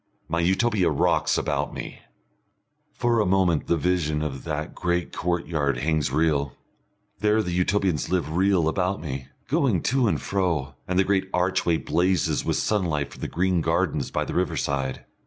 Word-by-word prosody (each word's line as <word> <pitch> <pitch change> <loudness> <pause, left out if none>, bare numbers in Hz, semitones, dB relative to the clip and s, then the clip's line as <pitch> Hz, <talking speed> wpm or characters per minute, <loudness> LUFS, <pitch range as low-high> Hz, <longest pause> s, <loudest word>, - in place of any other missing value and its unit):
My 85 - -1
Utopia 95 +3 +2
rocks - - +2
about - - -1
me. - - -7 0.9
For 120 -1 +1
a 105 - +3
moment 90 -4 +2
the 85 - +2
vision 75 -2 0
of 70 -3 -5
that 75 -1 -3
great 85 0 -1
courtyard 85 -6 -1
hangs 75 +1 0
real. 75 -3 +1 0.7
There 105 +1 +2
the 90 - -3
Utopians 90 -2 +1
live 85 -4 -1
real 95 -3 +3
about 90 +3 0
me, 65 -4 -5 0.2
going - - +1
to 130 -3 +3
and - - +1
fro, 85 -9 -1
and 90 - -1
the 95 - +5
great 95 -1 0
archway 90 -2 +1
blazes 90 +2 +1
with - - 0
sunlight 85 -9 0
from - - -13
the - - -2
green 90 -1 +1
gardens 80 -4 0
by - - -1
the - - -5
riverside. 70 -7 -1
85 Hz, 160 wpm, -25 LUFS, 75-95 Hz, 0.9 s, the